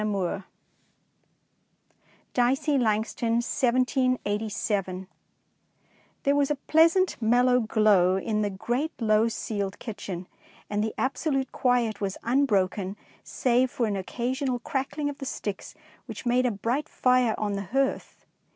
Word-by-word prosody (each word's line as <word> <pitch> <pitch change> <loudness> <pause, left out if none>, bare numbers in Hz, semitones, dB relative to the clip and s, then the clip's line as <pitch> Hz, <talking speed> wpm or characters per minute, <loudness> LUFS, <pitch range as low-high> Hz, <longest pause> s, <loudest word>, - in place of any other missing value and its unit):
219 200 -2 -1 1.9
Dicey 270 +4 +2
Langston 225 0 0
1787 230 -6 0 1.2
HERE 280 +1 +4
WAS 285 -1 +2
A 295 - +1
pleasant 330 +4 +3
mellow 245 +2 +4
glow 215 -5 +3
in 215 +2 -1
the 205 - 0
great 240 - -2
low 220 -1 +3
ceiled 205 -3 -3
kitchen, 190 -5 -6 0.5
and 210 0 0
the 220 - -3
ab 265 +1 0
solute 270 -4 -1
quiet 240 -5 +1
was 195 -1 -2
un 265 +5 +3
broken 195 -1 0 0.3
save 255 0 +1
for 245 - -1
an 210 -2 -1
occasional 245 +7 -2
crackling 275 +4 -3
of 290 -1 -5
the 270 - -5
sticks 205 -6 -5 0.3
which - - -8
made 250 +1 +3
a - - +1
bright 235 +8 -2
fire 250 -3 +2
on 210 -1 -1
the 200 0 -3
hearth. 270 +7 -2
235 Hz, 130 wpm, -26 LUFS, 205-260 Hz, 1.9 s, HERE